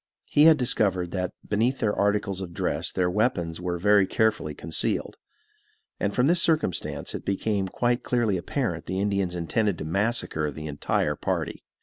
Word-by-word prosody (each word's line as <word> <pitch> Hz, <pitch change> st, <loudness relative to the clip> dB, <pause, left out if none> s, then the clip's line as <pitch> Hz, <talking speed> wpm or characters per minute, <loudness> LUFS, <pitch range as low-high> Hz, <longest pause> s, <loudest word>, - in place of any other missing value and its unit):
He 150 Hz, -, +4 dB
had 160 Hz, -1 st, +8 dB
discovered 95 Hz, -8 st, +1 dB
that 90 Hz, -1 st, -2 dB, 0.2 s
beneath 115 Hz, +6 st, +1 dB
their 105 Hz, -3 st, 0 dB
articles 100 Hz, -2 st, 0 dB
of 85 Hz, -2 st, -7 dB
dress -, -, -1 dB
their 90 Hz, -1 st, +1 dB
weapons 90 Hz, -5 st, 0 dB
were 90 Hz, -1 st, -2 dB
very 100 Hz, +1 st, +4 dB
carefully 105 Hz, -8 st, 0 dB
concealed; 80 Hz, +2 st, -1 dB, 0.8 s
and 100 Hz, -, 0 dB
from 125 Hz, +4 st, +2 dB
this 170 Hz, +3 st, +3 dB
circumstance 155 Hz, -, 0 dB
it -, -, -5 dB
became 100 Hz, 0 st, -1 dB
quite 120 Hz, +5 st, 0 dB
clearly 120 Hz, -5 st, +1 dB
apparent 90 Hz, -, -2 dB
the 95 Hz, +1 st, -2 dB
Indians 100 Hz, -3 st, 0 dB
intended 90 Hz, +3 st, 0 dB
to -, -, -5 dB
massacre 85 Hz, -4 st, 0 dB
the 75 Hz, +2 st, -8 dB
entire 75 Hz, -1 st, -1 dB
party. -, -, -3 dB
100 Hz, 160 wpm, -26 LUFS, 90-110 Hz, 0.8 s, had